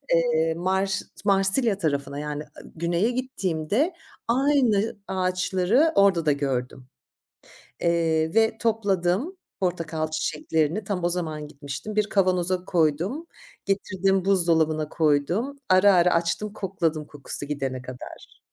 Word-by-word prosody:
Eee, 160 -1 +2
Mars 190 +3 0 0.2
Marsilya 195 +3 +3
tarafına, 140 -5 -2
yani 150 0 -4
ı - - -15
güneye 170 +6 0
gittiğimde 245 - -1 0.3
aynı 245 -4 +2
ağaçları 185 - +1
orada 195 -5 +4
da 150 - +4
gördüm, 130 -2 -3 0.9
eee, 165 -1 +1
ve 225 0 +3
topladım 215 - 0 0.2
portakal 165 -4 -2
çiçeklerini. 155 +4 -1
Tam 190 -3 -3
o 175 - +2
zaman 160 -4 -3
gitmiştim. 145 +8 -7
Bir 210 -1 +2
kavanoza 185 -2 +1
koydum, 175 - 0 0.4
getirdim, 195 -1 0
buzdolabına 160 -5 +2
koydum. 170 - 0
Ara 185 +2 +6
ara 180 -1 +5
açtım, 170 +5 -1
kokladım, 165 -7 -2
kokusu 145 0 -5
gidene 135 -3 -3
kadar. 130 0 -11
180 Hz, 115 wpm, -25 LUFS, 155-200 Hz, 0.9 s, Ara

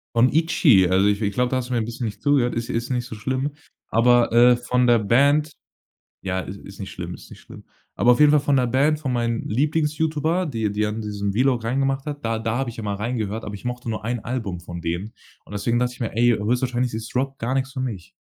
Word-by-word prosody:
Von 120 +2 +4
„ITCHY“. 145 - +4
Also, 95 +2 +3
ich 105 +1 +1
ich 100 -1 -1
glaube, 125 +2 +1
da 130 - +1
hast 125 -1 -3
du - - -2
mir 120 - +1
'n - - -1
bisschen 120 +1 -5
nicht 105 - -6
zugehört. 135 -5 +2
Ist 115 0 -3
ist 115 +1 -2
nicht 125 -2 -1
so 115 - -8
schlimm. 130 +6 -2 0.4
Aber, 120 +1 +4
äh, 120 +1 +6
von 125 0 0
der 120 -1 +5
Band 140 +8 +3 0.7
ja, 95 -1 -1
i - - -9 0.2
ist 100 +1 -12
nicht 95 - -6
schlimm, - - -6
ist - - -12
nicht - - -13
schlimm. - - -13 0.3
Aber 125 - +4
auf 120 - -2
jeden 150 -1 +7
Fall 150 - +5
von 145 0 +1
der 125 - +3
Band, 145 +5 +2
von 135 -4 -2
meinen 115 -1 -1
Lieblings-Youtuber, 155 +5 0
die 110 -6 -2
die 105 +1 0
an 105 +1 -4
diesen 100 -1 -3
Vlog 125 0 +1
reingemacht 135 +4 -1
hat, 145 -4 -5
da 115 0 -1
da 115 +1 -1
habe 135 -3 -2
ich 115 - -11
immer 105 -2 -3
reingehört, 110 0 -3
aber 105 - -6
ich 100 - -9
mochte 125 0 -4
nur 110 -1 -3
1 120 +1 -2
Album 115 -8 -3
von 85 0 -8
denen. 85 +6 -4 0.3
Und - - -16
deswegen 115 +4 0
dacht 125 0 +1
ich 125 - -14
mir: 115 -2 -4
„Ey, 120 +1 +4
höchstwahrscheinlich 125 +2 0
ist 110 +2 -7
Rock 135 +2 -1
gar 125 +3 -2
nix 135 0 -1
für 130 - -6
mich“. 95 -8 -5
120 Hz, 250 wpm, -23 LUFS, 110-135 Hz, 0.7 s, jeden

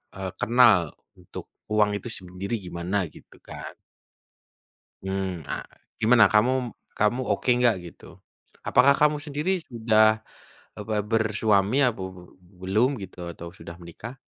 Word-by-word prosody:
eee, 95 -1 -5
kenal 115 -9 +4 0.3
untuk - - -10 0.3
uang 105 -1 +3
itu 120 - -8
sendiri 95 +3 -5
gimana 90 +3 -3 0.2
gitu - - -17
kan. - - -9 1.3
Mmm, 95 -3 -3
ah, - - -4 0.3
gimana 110 -2 +5
kamu 125 +3 +2 0.2
kamu 105 +5 +1
oke 105 +4 -2
nggak 120 -2 +4 0.2
gitu, - - -20 0.6
apakah 135 +3 +5
kamu 150 0 +3
sendiri 150 +3 -3 0.2
sudah, 110 -2 +3 0.6
apa 110 +1 -4 0.2
bersuami 110 0 +2
apa 110 - -5 0.2
be 90 - -12 0.4
belum 105 +7 +2
gitu, 95 -1 -10
atau 85 0 -9
sudah 85 - -9
menikah? 95 +8 -9
110 Hz, 125 wpm, -25 LUFS, 95-120 Hz, 1.3 s, gimana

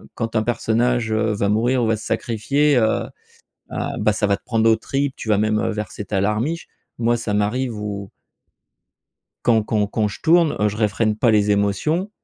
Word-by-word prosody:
quand 115 -1 -4
un 110 - +3
personnage, 120 0 0
heu, 110 0 +1
va 100 -1 0
mourir 120 +4 +2
ou 115 - +1
va 115 - +2
se 105 - -9
sacrifier 135 +6 +1
heu, 110 -2 +2 0.7
heu, - - -5 0.2
bah 105 - +2
ça 105 - 0
va 100 - +2
te - - -26
prendre 115 -1 +2
aux 110 - +4
tripes, 135 +4 -2
tu - - -8
vas 105 - +4
même, 110 0 +1
heu, - - 0
verser 105 -1 -5
ta 100 -1 -1
larmiche. 110 - -1 0.3
Moi 120 0 +2
ça 105 - -3
m'arrive 115 +4 -1
où 100 -1 -5 1.3
quand 115 -2 +3
quand 105 -1 0
quand 105 +1 -1
je 105 - -9
tourne, 165 -1 +4
heu, 105 - +3
je 105 - -5
réfrène 110 0 +1
pas 115 +1 +3
les 105 -1 +3
émotions, 105 - 0
110 Hz, 200 wpm, -21 LUFS, 105-120 Hz, 1.3 s, aux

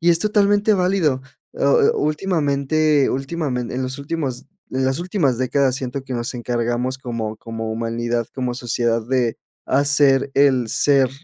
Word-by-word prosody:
y 170 +1 +4
es 165 - +4
totalmente 205 +1 +3
válido. 180 -8 +1 0.3
Oh - - -2 0.3
oh, - - -2
últimamente 150 -2 +1
últimamen 135 -3 -3
en 130 +1 -2
los 130 +1 -4
últimos 140 -3 -4 0.3
en 130 0 0
las 130 +4 0
últimas 175 - 0
décadas, 130 +1 +1
siento 130 0 -4
que 130 - -7
nos 120 0 -3
encargamos 120 +1 -2
como 115 -4 -4
como 115 -1 -5
humanidad, 115 +1 -2
como 125 -2 -3
sociedad, 120 -1 -1
de 125 -3 0 0.3
hacer 140 0 +3
el 135 -4 +3
ser 135 +1 +3
130 Hz, 150 wpm, -21 LUFS, 120-150 Hz, 0.3 s, y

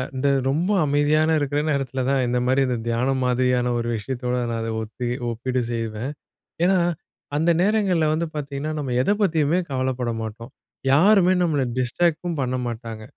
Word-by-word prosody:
இந்த 135 +2 0 0.2
ரொம்ப 165 +9 +1
அமைதியான 150 +2 +2
இருக்கிற 145 0 -1
நேரத்துல 135 -3 -1
தான் 140 - +2
இந்த 125 0 +1
மாரி 130 +2 +3
இந்த 125 - 0
தியானம் 130 +3 0
மாதிரியான 125 0 +1
ஒரு 120 0 -2
விஷயத்தோட 125 +3 -3
நான் 115 - -2
அத 115 - -3
ஒத்தி 115 +3 -5 0.2
ஒப்பீடு 125 +2 -2
செய்வேன். 115 +2 -3 0.5
என்னா, 190 +1 +4 0.6
அந்த 160 +3 +2
நேரங்கள்ல 195 -6 +2
வந்து 165 +1 -1
பாத்தீங்கன்னா, 145 +1 -4
நம்ம 135 -4 -3
எத 200 - 0
பத்தியுமே 165 -2 +2
கவலைப்பட 130 -2 -1
மாட்டோம். 115 +3 -7 0.4
யாருமே 185 +4 +5
நம்மள 150 -5 +1 0.2
டிஸ்ட்ராக்ட்டும் 165 +5 0
பண்ண 130 0 -1
மாட்டாங்க. 115 -2 -6
135 Hz, 150 wpm, -23 LUFS, 125-155 Hz, 0.6 s, யாருமே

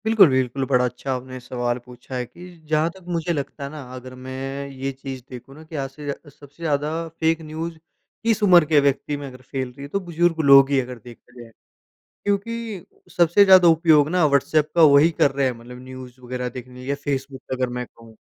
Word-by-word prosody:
बिल्कुल, 220 -6 +6
बिल्कुल, 130 0 0
बड़ा 125 -2 +2
अच्छा 125 +2 -3
आपने 130 0 -6
सवाल 120 -1 -2
पूछा 125 +1 -10
है 125 -1 -2
कि 175 +9 -13 0.2
जहाँ 155 +1 +2
तक 190 +1 -17
मुझे 170 -1 -1
लगता 140 -1 -5
है 140 - -4
ना, 155 0 -8
अगर 130 0 -9
मैं 135 +2 -5
ये 135 0 -4
चीज़ 135 -1 -8
देखूँ 130 +2 -11
ना 155 - -12
कि 160 0 -11
आज 135 -2 -3
से 145 +2 -11
जा 140 - -1 0.2
सबसे 145 +3 -15
ज़्यादा 150 -2 0 0.2
फ़ेक 165 0 -1
न्यूज़, 160 +1 -6 0.5
किस 225 -2 +1
उम्र 180 -5 +7
के 150 -1 +4
व्यक्ति 140 +1 0
में 145 -1 -7
अगर 130 -1 -12
फ़ैल 130 0 -4
रही 135 +3 -14
है, 140 - -6
तो 200 +7 -2
बुज़ुर्ग 175 -2 0
लोग 135 0 +8
ही 140 - +2
हैं, 130 - +2
अगर 125 0 -8
देखा 120 0 -15
जाए। 115 -1 -13 0.7
क्योंकि 205 -1 -3 0.3
सबसे 175 +4 +5
ज़्यादा 185 -2 +7
उपयोग 160 -3 +5
ना, 180 -1 +2
व्हाट्सएप 150 +1 +2
का 170 - +5
वही 150 +1 +7
कर 140 - +4
रहे 135 0 0
हैं, 130 - +1
मतलब 125 +1 -11
न्यूज़ 130 -1 -11
वगैरह 125 0 -4
देखने 125 0 -10
के 125 - -12
लिए 130 - -8
या 140 - +1
फेसबुक 135 -1 -3
पे, 130 - -1
अगर 130 -1 -1
मैं 125 - -3
कहूँ। 115 -1 -16
140 Hz, 225 wpm, -22 LUFS, 130-160 Hz, 0.7 s, लोग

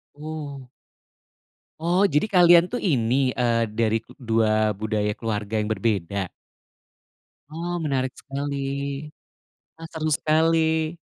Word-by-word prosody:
Wuh. 145 -3 -7 1.1
Oh, 180 +4 +3
jadi 150 +4 +1
kalian 175 -2 +6
tuh 245 - -2
ini, 130 - +1
eee, 115 -2 +1
dari 110 0 0 0.2
2 110 -2 +1
budaya 105 -1 -1
keluarga 110 -1 -2
yang 105 - 0
berbeda? 100 -3 -1 1.2
Oh, 170 +2 -4
menarik 130 -3 -1
sekali. 140 +1 -5 1.3
Ah, 165 - -7
seru 160 -1 -3
sekali. 160 +1 +2
135 Hz, 105 wpm, -24 LUFS, 110-160 Hz, 1.3 s, kalian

